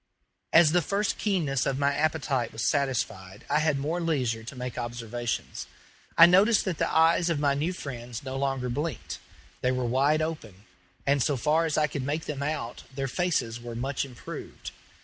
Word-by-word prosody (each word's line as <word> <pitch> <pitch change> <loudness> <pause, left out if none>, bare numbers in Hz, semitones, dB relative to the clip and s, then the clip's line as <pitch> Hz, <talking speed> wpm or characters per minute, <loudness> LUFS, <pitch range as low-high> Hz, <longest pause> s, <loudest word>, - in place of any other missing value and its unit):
As 165 -2 +7
the 175 +1 +3
first 200 +6 -1
keenness 155 - 0
of 135 - 0
my 140 0 +2
appetite 140 -5 0
was 110 - -4
satisfied 110 -9 -1
I 150 - +4
had 155 -2 +2
more 155 +6 -2
leisure 130 -9 0
to 120 +5 -8
make 125 -1 -5
observations. 120 0 -4 0.5
I 165 - +11
noticed 195 +5 +5
that 180 -4 -2
the - - +1
eyes 165 +2 +4
of 165 - +1
my 145 -1 +2
new 150 +6 -1
friends 120 -8 -7
no 130 -1 -5
longer 135 -2 -1
blinked; 145 +6 -4 0.4
they 125 - +2
were 130 -1 -1
wide 140 +6 +2
open; 115 - -6 0.4
and, 140 0 +2
so 140 +2 +1
far 155 +6 +2
as 155 - -1
I 155 - +4
could 145 -1 -4
make 145 +4 -2
them 140 -2 -4
out, 140 -5 -3
their 135 0 -2
faces 130 -7 -1
were 120 -1 -7
much 135 +3 -2
improved. 125 -3 -8
140 Hz, 185 wpm, -27 LUFS, 125-160 Hz, 0.5 s, I